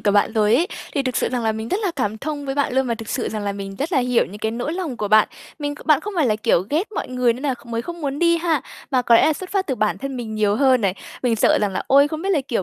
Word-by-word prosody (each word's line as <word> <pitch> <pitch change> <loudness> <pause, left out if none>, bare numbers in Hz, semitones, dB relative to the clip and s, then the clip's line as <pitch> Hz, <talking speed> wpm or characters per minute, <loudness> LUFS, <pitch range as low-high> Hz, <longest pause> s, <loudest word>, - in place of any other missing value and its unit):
của 205 - +2
bạn 205 +2 +3
rồi 215 0 +3
ấy, 330 +7 +3 0.3
thì 280 - +1
thực 255 -2 -2
sự - - +1
rằng 245 -2 -2
là 220 - +1
mình 220 +1 -5
rất 390 - 0
là 370 - +1
cảm 220 -5 -1
thông 290 +2 -4
với 270 - -2
bạn 285 -3 0
luôn 265 0 +2
và 235 - 0
thực 225 -1 -9
sự 250 - -2
rằng 215 -1 -4
là 200 - -1
mình 195 -1 -7
rất 310 +6 -3
là 270 - +3
hiểu 250 -1 +2
những 205 - -10
cái 220 +1 -1
nỗi 240 +7 -3
lòng 340 -8 -4
của 210 -2 -3
bạn. 215 +1 +5 0.3
Mình 290 -1 -3
kh - - -14
bạn 305 -3 +5
không 420 - -6
phải 310 -6 +3
là 215 - +2
kiểu 215 - +2
ghét 360 +9 -1
mọi - - -3
người 250 -1 +2
nên 250 +4 -9
nà 275 -3 0
kh - - -18
mới 230 0 -3
không 345 +5 -7
muốn 280 -2 -3
đi 340 0 +4
ha, 320 -5 0 0.3
mà 255 -2 +2
có 235 - +4
lẽ 230 - +6
là 315 - +4
xuất 365 +5 -7
phát 390 -1 0
từ 265 - -1
bản 215 -3 0
thân 275 0 -5
mình 225 -3 -5
nhiều 210 -1 +2
hơn 260 -3 +4
này, 195 -4 +1 0.3
mình 240 -3 +2
sợ - - +4
rằng 205 -2 0
là - - -2
"Ôi 280 +2 +5
không 315 +1 -5
biết 390 - -1
là, 305 - +2
kiểu, 230 -7 0
255 Hz, 340 wpm, -21 LUFS, 220-295 Hz, 0.3 s, lẽ